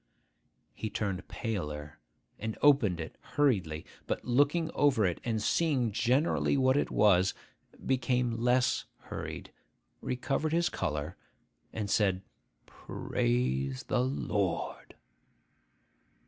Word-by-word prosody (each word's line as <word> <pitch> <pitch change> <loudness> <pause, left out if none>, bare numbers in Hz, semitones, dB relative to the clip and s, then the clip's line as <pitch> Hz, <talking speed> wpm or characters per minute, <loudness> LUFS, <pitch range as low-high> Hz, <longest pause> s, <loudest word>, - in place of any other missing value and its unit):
He 110 - -4
turned 95 -3 -3
paler, 75 -9 -4 0.4
and 110 0 -4
opened 125 - +5
it 80 - -7
hurriedly; 95 - 0 0.2
but - - -2
looking 145 +6 +2
over 135 -8 +3
it, 90 -2 -1
and 115 -2 -1
seeing 130 -1 +1
generally 130 +7 +2
what 130 0 +4
it 145 - +1
was, 95 -3 +4 0.5
became 125 -1 +1
less 125 +1 +2
hurried, - - -7 0.5
recovered 135 +5 -1
his 170 +1 +2
colour, 75 -1 -3 0.5
and 105 -2 -3
said, 95 -2 +2 0.4
'Praise 65 +2 -1
the - - +2
Lord! 105 -8 -2
110 Hz, 105 wpm, -30 LUFS, 90-130 Hz, 0.5 s, opened